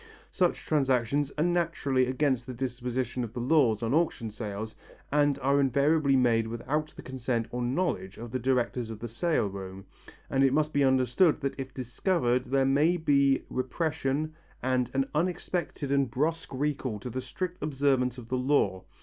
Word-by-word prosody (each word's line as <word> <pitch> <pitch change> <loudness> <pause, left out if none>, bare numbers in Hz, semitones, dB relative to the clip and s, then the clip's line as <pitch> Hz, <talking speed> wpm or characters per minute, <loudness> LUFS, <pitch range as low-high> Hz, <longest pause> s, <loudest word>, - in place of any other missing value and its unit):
Such 180 -2 0
transactions 135 -1 +1
are 150 - +2
naturally 165 -7 +1
against 130 -2 0
the 130 - -6
disposition 125 0 -2
of 115 -2 -6
the - - -4
laws 120 -5 +3
on 115 +3 0
auction 150 -9 0
sales, 110 0 -5 0.4
and 145 -1 +3
are 140 +1 +3
invariably 140 +2 +3
made 115 -3 +3
without 135 +7 -2
the - - -10
consent 125 -3 -2
or 125 - -3
knowledge 120 - -1
of 115 0 -8
the 130 - -1
directors 125 -2 0
of 110 - -6
the 120 - -6
sale 160 +4 0
room, 95 -1 -7 0.4
and 135 0 +2
it 135 -1 +4
must 155 +1 +1
be 145 - +3
understood 130 +6 +3
that 140 0 -3
if 130 0 -5
discovered 125 - 0
there 135 +1 +2
may 150 +6 +3
be 140 -4 +3
repression 150 +2 -2 0.3
and 130 -1 +1
an 135 0 +1
unexpected 170 -3 -2
and 140 -2 +2
brusque 155 +5 -1
recall 135 -4 -2
to 125 +4 -6
the 130 - -3
strict 180 +8 -5
observance 135 -3 +1
of 120 -3 -9
the 130 - 0
law. 125 -8 +1
130 Hz, 170 wpm, -28 LUFS, 120-150 Hz, 0.4 s, it